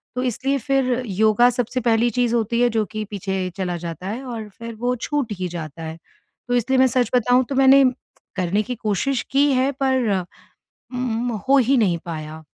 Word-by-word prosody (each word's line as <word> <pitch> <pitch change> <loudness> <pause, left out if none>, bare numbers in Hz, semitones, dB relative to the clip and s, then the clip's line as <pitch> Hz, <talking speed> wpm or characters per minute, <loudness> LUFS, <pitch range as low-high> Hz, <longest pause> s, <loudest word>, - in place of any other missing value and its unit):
तो 250 - -1
इसलिए 260 +3 0
फिर 270 -1 +1 0.2
योगा 215 +4 +4
सबसे 245 +1 -2
पहली 230 0 +2
चीज़ 240 -1 0
होती 235 +1 0
है, 245 - +4
जो 220 -2 0
कि 215 +1 -5
पीछे 190 -2 -3
चला 180 -2 -2
जाता 170 +1 -6
है 230 +7 -4
और 225 -4 -6
फिर 230 0 -7
वो 245 +1 0
छूट 255 -1 -2
ही 185 - -1
जाता 165 -2 -7
है। 160 0 -6 0.5
तो 245 - +1
इसलिए 255 +2 +1
मैं 260 - +6
सच 245 -2 +1
बताऊँ 250 +2 +4
तो 275 - -2
मैंने 270 +1 +6 0.5
करने 190 +3 0
की 250 +3 -4
कोशिश 230 +4 -1
की 280 +1 +4
है 260 +2 +2
पर 260 -5 +2 0.8
उम, 245 -1 -1 0.2
हो 275 - +6
ही 265 +2 +3
नहीं 190 -8 +2
पाया। 155 -1 -7
235 Hz, 190 wpm, -22 LUFS, 200-255 Hz, 0.8 s, मैं